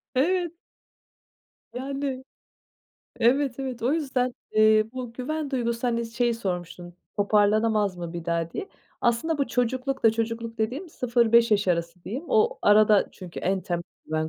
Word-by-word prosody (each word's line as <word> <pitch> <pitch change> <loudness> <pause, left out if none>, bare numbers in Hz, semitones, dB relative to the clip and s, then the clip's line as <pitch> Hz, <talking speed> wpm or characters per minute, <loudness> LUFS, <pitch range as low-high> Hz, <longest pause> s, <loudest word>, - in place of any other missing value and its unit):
Evet. 345 +4 +2 1.2
Yani, 270 0 -4 1.0
evet, 265 +2 +2
evet. 260 -4 -5
O 255 +5 +2
yüzden, 260 -6 0 0.2
eee, 215 0 +5
bu 250 -2 -6
güven 290 +4 -3
duygusu, 235 -2 -1
hani, 235 -1 0
şeyi 235 +1 0
sormuştun, 175 -4 -5 0.2
toparlanamaz 210 -1 +2
mı 170 -1 -6
bir 170 -1 -6
daha, 170 0 -1
diye. 400 - -5 0.3
Aslında 240 +7 +1
bu 280 - +1
çocuklukta 250 +1 +1
çocukluk 230 0 -3
dediğim, 255 +11 -2
0-5 235 -4 +3
yaş 205 -2 +2
arası 170 0 -1
diyeyim. 260 - -5
O 470 +1 +2
arada, 210 0 +5
çünkü 180 -2 -9
en 190 +1 0
temel 175 -2 -3 0.2
güven 155 0 -1
230 Hz, 140 wpm, -26 LUFS, 205-260 Hz, 1.2 s, eee